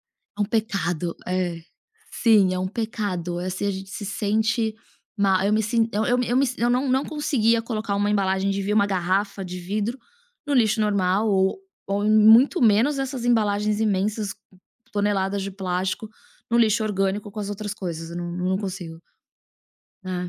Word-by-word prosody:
É 210 Hz, -, -9 dB
um -, -, +2 dB
pecado, 195 Hz, -7 st, -1 dB
é. 180 Hz, -2 st, -1 dB, 0.5 s
Sim, 210 Hz, -5 st, +4 dB
é 185 Hz, -, -2 dB
um 185 Hz, -, -1 dB
pecado, 195 Hz, -5 st, -3 dB
assim, 185 Hz, +2 st, -3 dB
a -, -, +1 dB
gente 190 Hz, 0 st, -7 dB
se 205 Hz, +2 st, -6 dB
sente 215 Hz, +2 st, 0 dB, 0.4 s
má, 195 Hz, -2 st, +2 dB
eu 205 Hz, -, +2 dB
me 215 Hz, -, +3 dB
sin 225 Hz, +1 st, +1 dB
eu 210 Hz, +2 st, 0 dB
eu 245 Hz, 0 st, +1 dB
me 275 Hz, -, +4 dB
si 250 Hz, -, -5 dB
eu 240 Hz, -, +3 dB
não 250 Hz, +3 st, +1 dB
não 265 Hz, +2 st, +2 dB
conseguia 235 Hz, -7 st, +1 dB
colocar 220 Hz, -3 st, -3 dB
uma 205 Hz, +1 st, +1 dB
embalagem 195 Hz, -1 st, +1 dB
de 195 Hz, 0 st, -2 dB
vi 200 Hz, +2 st, -1 dB
uma 205 Hz, -1 st, +3 dB
garrafa 195 Hz, +1 st, -1 dB
de 180 Hz, 0 st, -6 dB
vidro 210 Hz, +7 st, -2 dB, 0.5 s
no 290 Hz, -, 0 dB
lixo 220 Hz, -4 st, +3 dB
normal 200 Hz, 0 st, +1 dB
ou 190 Hz, -, +2 dB, 0.3 s
ou 200 Hz, +1 st, -1 dB
em -, -, +2 dB
muito 220 Hz, -, +6 dB
menos 235 Hz, +6 st, +4 dB
essas 260 Hz, -2 st, -3 dB
embalagens 210 Hz, -3 st, +1 dB
imensas, 205 Hz, 0 st, 0 dB, 0.6 s
toneladas 200 Hz, -1 st, 0 dB
de 195 Hz, +1 st, -4 dB
plástico, 185 Hz, +2 st, -3 dB, 0.4 s
no 235 Hz, -, +2 dB
lixo 220 Hz, -1 st, +3 dB
orgânico 200 Hz, 0 st, -1 dB
com 215 Hz, -, -7 dB
as 205 Hz, -1 st, -4 dB
outras 205 Hz, 0 st, -4 dB
coisas, 170 Hz, -6 st, -6 dB
eu 170 Hz, -, -6 dB
não 175 Hz, 0 st, -4 dB
não 180 Hz, +2 st, -1 dB
consigo. 180 Hz, -5 st, -6 dB, 1.0 s
É. 180 Hz, -1 st, -3 dB
205 Hz, 180 wpm, -24 LUFS, 190-220 Hz, 1.0 s, muito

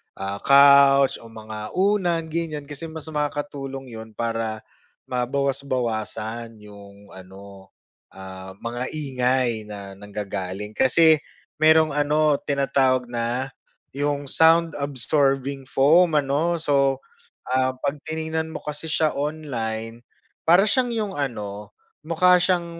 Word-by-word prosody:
ah, 100 Hz, +1 st, -5 dB
couch 140 Hz, 0 st, +6 dB
o 115 Hz, -, -13 dB
mga 110 Hz, -1 st, -8 dB
unan 180 Hz, -4 st, +1 dB
ganyan 160 Hz, -3 st, -3 dB
kasi 145 Hz, +3 st, -6 dB
mas 160 Hz, -1 st, -8 dB
makakatulong 145 Hz, -3 st, -4 dB
yun 110 Hz, 0 st, -9 dB
para, 115 Hz, -1 st, -3 dB, 0.4 s
mabawas-bawasan 120 Hz, -4 st, -2 dB
yung 100 Hz, -1 st, -14 dB
ano, 95 Hz, +1 st, -13 dB, 0.5 s
ah, 95 Hz, 0 st, -10 dB
mga 120 Hz, +4 st, -5 dB
ingay 125 Hz, -6 st, -1 dB
na 100 Hz, -2 st, -8 dB
nanggagaling. 100 Hz, -1 st, -5 dB
Kasi 155 Hz, +7 st, +4 dB, 0.4 s
mayrong 155 Hz, 0 st, +5 dB
ano 150 Hz, 0 st, +2 dB
tinatawag 135 Hz, -2 st, +1 dB
na, 120 Hz, +3 st, -2 dB, 0.4 s
yung 145 Hz, 0 st, -2 dB
sound 165 Hz, 0 st, +4 dB
absorbing 135 Hz, 0 st, 0 dB
foam 160 Hz, +6 st, +4 dB
ano 150 Hz, +4 st, +1 dB
so, 140 Hz, -4 st, +1 dB, 0.4 s
ah, 130 Hz, 0 st, +1 dB
pag 140 Hz, -, -1 dB, 0.2 s
tiningnan 160 Hz, 0 st, -3 dB
mo 160 Hz, -, -5 dB
kasi 150 Hz, +2 st, -6 dB
siya 155 Hz, -1 st, +1 dB
online, 120 Hz, -7 st, -4 dB, 0.4 s
para 175 Hz, +5 st, +5 dB
siyang 245 Hz, +3 st, +1 dB
yung 215 Hz, -4 st, -2 dB
ano 105 Hz, -7 st, -5 dB, 0.3 s
mukha 180 Hz, +3 st, +4 dB
siyang 180 Hz, -1 st, +1 dB
135 Hz, 115 wpm, -23 LUFS, 115-155 Hz, 0.5 s, couch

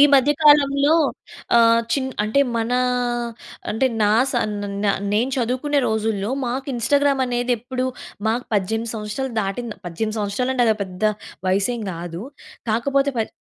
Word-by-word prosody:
మధ్య 275 Hz, +2 st, +5 dB
కాలంలో 285 Hz, 0 st, +5 dB, 0.6 s
ఆహ్, 230 Hz, 0 st, +5 dB
చిన్ 265 Hz, -2 st, 0 dB, 0.2 s
అంటే 220 Hz, +6 st, +2 dB, 0.2 s
మనా 235 Hz, +2 st, +1 dB, 0.9 s
అంటే 225 Hz, +5 st, +2 dB, 0.2 s
నా 205 Hz, -, +4 dB, 0.2 s
సన్ 225 Hz, -4 st, 0 dB, 0.3 s
న -, -, +2 dB, 0.3 s
నేను 230 Hz, +5 st, +1 dB
చదువుకునే 260 Hz, +4 st, 0 dB
రోజుల్లో 220 Hz, -1 st, -1 dB, 0.2 s
మాకు 260 Hz, +3 st, -3 dB
ఇన్‌స్టాగ్రామ్ 280 Hz, +3 st, +2 dB
అనేది 245 Hz, 0 st, 0 dB
ఎప్పుడు 255 Hz, +2 st, -3 dB, 0.4 s
మాకు 240 Hz, +3 st, 0 dB
18 220 Hz, +3 st, -1 dB
సంవత్సరాలు 220 Hz, +5 st, -4 dB
దాటిం 200 Hz, +5 st, -3 dB, 0.2 s
18 215 Hz, +6 st, -3 dB
సంవత్సరాలు 210 Hz, +6 st, -1 dB
అంటే 245 Hz, -2 st, +3 dB
అది 220 Hz, -1 st, +3 dB
పెద్ద 185 Hz, +1 st, -11 dB, 0.4 s
వయనేసేమి 200 Hz, +5 st, 0 dB
కాదు. 170 Hz, +1 st, -6 dB, 0.5 s
కాకపోతే 275 Hz, +5 st, +1 dB
పద్ 220 Hz, -, -2 dB
235 Hz, 135 wpm, -21 LUFS, 215-265 Hz, 0.9 s, మధ్య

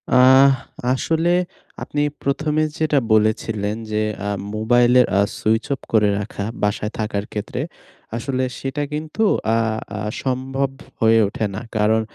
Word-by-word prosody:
আহ 130 Hz, +2 st, +7 dB, 0.4 s
আসলে 165 Hz, +5 st, 0 dB, 0.5 s
আপনি 145 Hz, -, -2 dB, 0.2 s
প্রথমে 150 Hz, +2 st, 0 dB
যেটা 155 Hz, -3 st, +2 dB
বলেছিলেন 110 Hz, -1 st, +1 dB, 0.2 s
যে, 105 Hz, -, +1 dB, 0.3 s
আ -, -, 0 dB, 0.3 s
মোবাইলের 120 Hz, +3 st, +4 dB
আ -, -, +4 dB, 0.2 s
সুইচ 110 Hz, +1 st, +1 dB
অফ 135 Hz, -, -6 dB
করে 105 Hz, -2 st, +4 dB
রাখা 100 Hz, 0 st, -5 dB, 0.2 s
বাসায় 105 Hz, +1 st, 0 dB
থাকার 105 Hz, -1 st, -2 dB
ক্ষেত্রে, 110 Hz, +4 st, -4 dB, 0.6 s
আসলে 130 Hz, +1 st, -2 dB, 0.2 s
সেটা 135 Hz, +2 st, -3 dB
কিন্তু 155 Hz, +8 st, -2 dB, 0.3 s
আ -, -, +3 dB, 0.4 s
আ -, -, -4 dB, 0.2 s
সম্ভব 135 Hz, +1 st, -1 dB, 0.3 s
হয়ে 115 Hz, 0 st, +5 dB
ওঠে 105 Hz, +2 st, -2 dB
না। 110 Hz, -, -4 dB, 0.2 s
কারণ 110 Hz, +1 st, +3 dB
120 Hz, 135 wpm, -21 LUFS, 110-140 Hz, 0.6 s, আহ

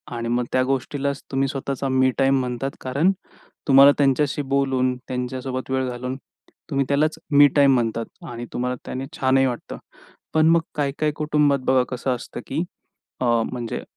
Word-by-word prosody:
आणि 115 Hz, 0 st, -3 dB
मग 120 Hz, +1 st, +1 dB
त्या 130 Hz, -, +2 dB
गोष्टीलाचं 135 Hz, +1 st, -2 dB
तुम्ही 135 Hz, 0 st, +1 dB
स्वतःचा 135 Hz, 0 st, -3 dB
मी 130 Hz, 0 st, +3 dB
टाईम 135 Hz, 0 st, +3 dB
म्हणतात. 125 Hz, +1 st, -3 dB
कारण 140 Hz, +9 st, +2 dB, 0.6 s
तुम्हाला 140 Hz, +1 st, +8 dB
त्यांच्याशी 140 Hz, +1 st, +2 dB
बोलून, 135 Hz, -2 st, 0 dB
त्यांच्यासोबत 130 Hz, +1 st, -4 dB
वेळ 130 Hz, -1 st, 0 dB
घालून 125 Hz, +1 st, -4 dB, 0.5 s
तुम्ही 140 Hz, -2 st, 0 dB
त्यालाचं 150 Hz, +3 st, +1 dB, 0.2 s
मी 145 Hz, 0 st, +9 dB
टाईम 140 Hz, -2 st, +6 dB
म्हणतात 115 Hz, -1 st, -1 dB, 0.3 s
आणि 120 Hz, 0 st, -6 dB
तुम्हाला 125 Hz, +1 st, -1 dB
त्याने 130 Hz, +1 st, -4 dB
छानही 135 Hz, 0 st, +3 dB
वाटतं. 120 Hz, -2 st, -4 dB, 0.6 s
पण 155 Hz, 0 st, +4 dB
मग 165 Hz, 0 st, +5 dB
काही 145 Hz, -2 st, 0 dB
काही 155 Hz, -1 st, +1 dB
कुटुंबात 150 Hz, -2 st, +2 dB
बघा 130 Hz, -1 st, +4 dB
कसं 125 Hz, 0 st, -1 dB
असतं, 120 Hz, -, -8 dB
की 155 Hz, +5 st, -1 dB, 0.6 s
अ, -, -, +1 dB, 0.3 s
म्हणजे 120 Hz, -2 st, -4 dB
135 Hz, 160 wpm, -23 LUFS, 125-140 Hz, 0.6 s, मी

